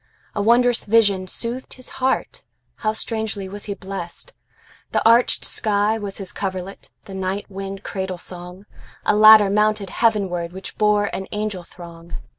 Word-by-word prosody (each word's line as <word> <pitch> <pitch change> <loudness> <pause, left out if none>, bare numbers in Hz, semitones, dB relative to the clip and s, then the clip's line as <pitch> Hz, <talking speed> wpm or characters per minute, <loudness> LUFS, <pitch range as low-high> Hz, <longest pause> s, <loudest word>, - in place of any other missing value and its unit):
A 205 - -1
wondrous 240 +2 +3
vision 200 -4 +3
soothed 240 +6 -3
his 255 - -9
heartHow 220 -3 -3
strangely 220 -3 -3
was 205 +2 -6
he 200 - -4
blessed! 195 - -7 0.6
The - - +3
arched 235 +2 +4
sky 210 0 +1
was 200 -2 -5
his 195 -2 -7
coverlet, 190 0 -5 0.2
The 195 - -10
night 190 +1 -3
wind 195 0 -6
cradle 190 -2 -4
song;A 180 +4 -6
ladder 215 -1 +8
mounted 210 -1 +2
heavenwardWhich 190 -5 -1
bore 210 -1 +3
an 190 - -5
angel 210 -3 -3
throng. 170 -1 -11
200 Hz, 135 wpm, -21 LUFS, 190-215 Hz, 0.6 s, ladder